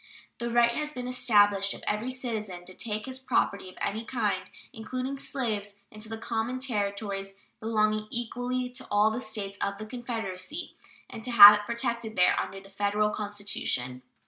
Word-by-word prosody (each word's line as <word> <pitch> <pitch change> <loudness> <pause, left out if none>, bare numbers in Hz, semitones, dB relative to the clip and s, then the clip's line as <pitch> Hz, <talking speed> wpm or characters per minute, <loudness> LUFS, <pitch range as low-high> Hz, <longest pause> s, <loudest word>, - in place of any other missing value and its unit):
The 235 - -2
right 235 0 +4
has 300 +4 -3
been 250 -3 -5
established 205 -6 +3
of - - -13
every 215 +4 -1
citizen 220 -8 -3
to 185 - -12
take 215 +1 -3
his 260 0 -5
property 200 -7 0
of 185 - -15
any 215 +3 -2
kind, 210 -6 -1 0.2
including 255 +4 -4
slaves, 210 -8 -2 0.2
into 215 0 -6
the 225 - -4
common 230 +2 -2
Territories 200 -5 -2 0.3
belonging 215 -1 +1
equally 245 +2 -2
to 250 - -7
all 205 +1 +4
the 225 - -2
States 210 -4 -5
of 200 0 -2
the 215 - -7
Confederacy, 225 - -5 0.3
and 225 - -9
to 250 - -4
have 210 -3 +12
it 210 0 -1
protected 235 -1 -2
there 180 - +5
under 195 - -4
the 195 0 -16
Federal 205 +1 +1
Constitution. 205 -13 -2
215 Hz, 170 wpm, -28 LUFS, 205-240 Hz, 0.3 s, have